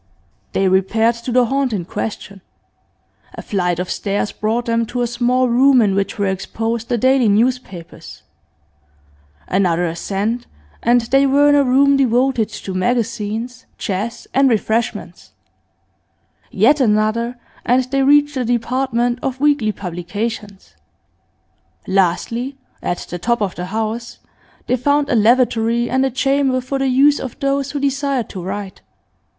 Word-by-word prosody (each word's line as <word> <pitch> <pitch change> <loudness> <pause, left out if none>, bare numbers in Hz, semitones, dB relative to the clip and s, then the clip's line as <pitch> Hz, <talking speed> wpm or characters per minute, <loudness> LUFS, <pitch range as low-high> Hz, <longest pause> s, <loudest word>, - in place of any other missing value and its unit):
They 195 - +2
repaired 195 +5 +2
to 235 +2 -6
the 250 0 +4
haunt 270 0 0
in 185 -5 -3
question. 200 0 -6 0.9
A - - -8
flight 180 -4 -1
of 180 0 -3
stairs 205 0 -2
brought 225 +3 -2
them 230 -1 +1
to 245 +1 -2
a - - +1
small 245 +2 +1
room 255 +2 +4
in 205 -4 +3
which 195 0 -1
were 205 - 0
exposed 225 +4 -3
the 240 - +1
daily 260 -1 +3
newspapers; 215 -5 -2 1.2
another 180 -2 +1
ascent, 200 +8 -3 0.3
and 240 +1 +3
they 270 +4 +2
were 285 +2 +4
in - - +5
a 285 -1 +4
room 275 +2 +4
devoted 250 -2 +2
to 190 - -7
magazines, 230 +3 -2
chess, 215 +3 -4
and 270 0 +4
refreshments; 225 0 -2 1.2
yet 295 +1 +3
another, 230 +2 +1 0.3
and 250 +2 +2
they 275 0 +1
reached 290 +2 +4
the 260 -2 -1
department 245 +1 0
of 260 -1 -3
weekly 285 -7 +2
publications; 200 +3 -6 1.1
lastly, 195 +8 0 0.2
at 175 - -2
the 175 - -4
top 235 +6 0
of 200 -4 -1
the 175 - -5
house, 220 +4 -4 0.5
they 250 - +1
found 285 +3 +1
a - - +2
lavatory, 235 +1 +2
and 260 +1 +2
a 270 - +1
chamber 270 0 +1
for 265 +2 -4
the 270 - +1
use 280 +3 +4
of 255 -3 -7
those 275 0 0
who 290 - -3
desired 275 -2 -1
to 190 - -7
write. 195 +1 -6
235 Hz, 145 wpm, -18 LUFS, 205-260 Hz, 1.2 s, in